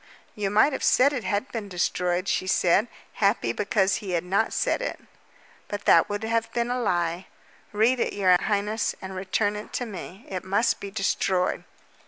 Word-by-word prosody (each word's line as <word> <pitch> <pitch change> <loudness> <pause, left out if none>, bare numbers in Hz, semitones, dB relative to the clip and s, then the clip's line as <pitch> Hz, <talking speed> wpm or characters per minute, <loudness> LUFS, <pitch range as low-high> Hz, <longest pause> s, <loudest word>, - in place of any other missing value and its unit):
"You 205 -3 -2
might 215 +8 +4
have - - -4
said 280 +3 +4
it 250 -5 -3
had 205 +6 -2
been 220 -4 -5
destroyed," 180 0 -1
she 185 +1 0
said, 185 +4 +3 0.3
happy 195 - +2
because 200 - +1
he 200 -5 -5
had 170 - 0
not 195 +5 0
said - - 0
it. - - -4 0.7
"But 205 0 -5
that - - +5
would 205 +1 -3
have 225 0 -1
been 240 0 -1
a 250 0 -1
lie. 175 -3 -1 0.4
Read 225 +5 +2
it, - - 0
your 185 -3 +4
highness, 210 +1 -1
and 190 0 -8
return 200 +2 0
it 210 - -8
to 245 - -2
me. 195 0 -9
It 185 -2 -5
must 200 +5 +1
be 200 - -6
destroyed." 195 -2 0
205 Hz, 185 wpm, -25 LUFS, 185-225 Hz, 0.7 s, that